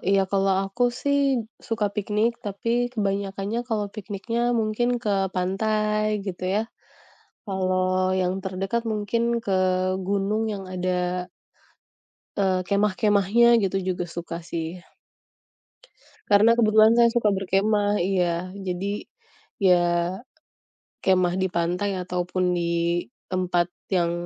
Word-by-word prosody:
iya, 195 Hz, -1 st, +4 dB
kalau 195 Hz, 0 st, +2 dB
aku 195 Hz, +6 st, -1 dB, 0.2 s
sihk 280 Hz, -2 st, +2 dB, 0.3 s
suka 225 Hz, -2 st, 0 dB
piknik, 210 Hz, +3 st, +1 dB
tapi 205 Hz, +3 st, -3 dB, 0.2 s
kebanyakannya 200 Hz, +1 st, -2 dB
kalau 210 Hz, -2 st, -1 dB
pikniknya 215 Hz, +3 st, -3 dB, 0.2 s
mungkin 215 Hz, +3 st, 0 dB, 0.2 s
ke 205 Hz, -, +1 dB, 0.2 s
pantai 215 Hz, +3 st, 0 dB, 0.2 s
gitu 185 Hz, -1 st, -5 dB
ya. 215 Hz, -, +2 dB, 0.9 s
Kalau 185 Hz, -1 st, +1 dB
yang 180 Hz, 0 st, 0 dB
terdekat 195 Hz, +5 st, -2 dB
mungkin 215 Hz, +2 st, -1 dB, 0.2 s
ke 195 Hz, -2 st, +1 dB, 0.5 s
gunung 200 Hz, +2 st, 0 dB
yang 195 Hz, -1 st, -6 dB
ada 180 Hz, 0 st, -1 dB, 1.1 s
eee, 185 Hz, -2 st, +2 dB
kemah-kemahnya, 210 Hz, +3 st, +3 dB
gitu 195 Hz, -2 st, 0 dB
juga 180 Hz, -1 st, -2 dB
suka 170 Hz, 0 st, -6 dB
sih. 165 Hz, +1 st, -4 dB, 1.5 s
Karena, 210 Hz, +3 st, +6 dB
kebetulan 220 Hz, 0 st, +6 dB
saya 235 Hz, -, +6 dB
suka 225 Hz, -3 st, +2 dB
berkemah 205 Hz, +2 st, +1 dB
iya. 180 Hz, -1 st, 0 dB
Jadi, 195 Hz, +2 st, -4 dB, 0.6 s
ya 175 Hz, 0 st, +3 dB, 0.9 s
kemah 185 Hz, -2 st, +3 dB
di 190 Hz, -, +1 dB
pantai 180 Hz, +3 st, -1 dB
ataupun 180 Hz, 0 st, -1 dB
di 170 Hz, 0 st, 0 dB, 0.2 s
tempat 180 Hz, -2 st, 0 dB, 0.2 s
yang 170 Hz, -2 st, +2 dB
195 Hz, 110 wpm, -24 LUFS, 180-210 Hz, 1.5 s, Karena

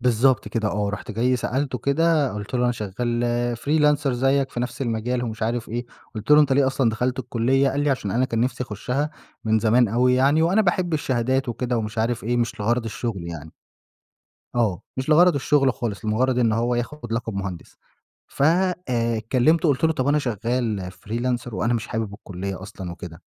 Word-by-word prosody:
بالضبط 120 Hz, -2 st, +2 dB
كده 110 Hz, 0 st, -1 dB
آه، 105 Hz, 0 st, -1 dB
رُحت 100 Hz, +2 st, -5 dB
جاي 120 Hz, +4 st, +1 dB
سألته 130 Hz, +1 st, -2 dB
كده 150 Hz, +2 st, +2 dB
قُلت 105 Hz, +4 st, -6 dB
له 125 Hz, 0 st, +2 dB
أنا 120 Hz, -, +2 dB
شغّال 120 Hz, +3 st, -1 dB
freelancer 150 Hz, +2 st, +2 dB
زيّك 135 Hz, +2 st, +1 dB
في 120 Hz, -, -4 dB
نفْس 125 Hz, +2 st, -3 dB
المجال 120 Hz, +1 st, -1 dB
ومش 110 Hz, -2 st, -5 dB
عارف 115 Hz, +1 st, -1 dB
إيه، 120 Hz, +2 st, -4 dB, 0.3 s
قُلت 110 Hz, +4 st, -6 dB
له: 150 Hz, 0 st, +8 dB
"أنت 145 Hz, -3 st, +3 dB
ليه 135 Hz, 0 st, +4 dB
أصلًا 130 Hz, -3 st, +2 dB
دخلت 125 Hz, +3 st, -1 dB
الكلية؟" 130 Hz, +2 st, +1 dB
قال 140 Hz, -, -1 dB
لي: 145 Hz, 0 st, +2 dB
"علشان 115 Hz, -7 st, -1 dB
أنا 125 Hz, +5 st, +2 dB
كان 115 Hz, -3 st, -1 dB
نفْسي 125 Hz, +1 st, -1 dB
أخشها 125 Hz, +7 st, -2 dB, 0.3 s
من 110 Hz, 0 st, +3 dB
زمان 115 Hz, +2 st, +3 dB
أوي 125 Hz, +4 st, +3 dB
يعني، 140 Hz, +5 st, +3 dB
وأنا 190 Hz, +6 st, +3 dB
باحب 175 Hz, -3 st, 0 dB
الشهادات 130 Hz, -1 st, 0 dB
وكده 120 Hz, 0 st, -1 dB
ومش 110 Hz, +1 st, -4 dB
عارف 115 Hz, +1 st, -1 dB
إيه 120 Hz, +2 st, 0 dB
مش 120 Hz, -2 st, -1 dB
لغرض 120 Hz, +3 st, +1 dB
الشغل 105 Hz, -5 st, -4 dB
يعني." 80 Hz, -2 st, -8 dB, 1.0 s
آه، 110 Hz, -5 st, 0 dB
مش 130 Hz, +2 st, -3 dB
لغرض 170 Hz, +3 st, +6 dB
الشغل 135 Hz, -1 st, +2 dB
خالص 110 Hz, -4 st, -4 dB
لمجرد 125 Hz, +4 st, +1 dB
إن 115 Hz, -3 st, +3 dB
هو 120 Hz, +2 st, +1 dB
ياخد 120 Hz, 0 st, -4 dB
لقب 115 Hz, -1 st, -2 dB
مُهندِس، 95 Hz, -3 st, -6 dB, 0.5 s
ف -, -, -4 dB
آآ، 155 Hz, -9 st, +1 dB
كلمته 155 Hz, +6 st, +4 dB
قُلت 140 Hz, +1 st, +1 dB
له: 160 Hz, -, +4 dB
"طَب 135 Hz, -3 st, -1 dB
أنا 145 Hz, +1 st, +3 dB
شغّال 115 Hz, -5 st, -2 dB, 0.2 s
freelancer 120 Hz, +2 st, -2 dB
وأنا 115 Hz, +2 st, 0 dB
مش 110 Hz, -3 st, -2 dB
حابب 110 Hz, -3 st, -3 dB
الكلية 95 Hz, -1 st, -6 dB
أصلًا" 95 Hz, -3 st, -7 dB
وكده، 85 Hz, -1 st, -10 dB
120 Hz, 190 wpm, -23 LUFS, 110-135 Hz, 1.0 s, له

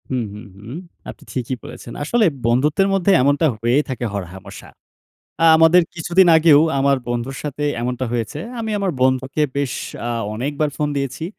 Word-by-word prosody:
হু, 130 Hz, -, -1 dB, 0.2 s
হু, 105 Hz, -, -9 dB, 0.2 s
হু। 100 Hz, +2 st, -13 dB, 0.4 s
আপনি -, -, -11 dB
ঠিকই 130 Hz, 0 st, -3 dB
বলেছেন। 120 Hz, -, -10 dB
আসলে 225 Hz, +8 st, +2 dB, 0.2 s
বন্ধুত্বের 145 Hz, +11 st, +2 dB
মধ্যে 195 Hz, 0 st, +2 dB
এমনটা 145 Hz, +4 st, +2 dB
হয়েই 120 Hz, +6 st, +1 dB
থাকে 125 Hz, -2 st, -3 dB
হরহামেশা। 95 Hz, -1 st, -8 dB, 0.7 s
অ্যা 165 Hz, -, +5 dB
আমাদের 165 Hz, +2 st, +6 dB
কিছুদিন 175 Hz, +2 st, +3 dB
আগেও 155 Hz, -2 st, +6 dB, 0.2 s
আমার 140 Hz, 0 st, +3 dB
বন্ধুর 120 Hz, +2 st, -3 dB
সাথে 150 Hz, 0 st, -4 dB, 0.2 s
এমনটা 125 Hz, +1 st, -2 dB
হয়েছে। 120 Hz, +5 st, -3 dB, 0.2 s
আমি 220 Hz, -1 st, -3 dB
আমার 195 Hz, -2 st, 0 dB
বন্ধুকে 130 Hz, +3 st, +1 dB
বেশ 140 Hz, -3 st, -1 dB, 0.4 s
আ -, -, -2 dB, 0.2 s
অনেকবার 145 Hz, +6 st, -2 dB
ফোন 150 Hz, -, 0 dB
দিয়েছি। 140 Hz, +3 st, -3 dB
140 Hz, 160 wpm, -20 LUFS, 120-160 Hz, 0.7 s, আমাদের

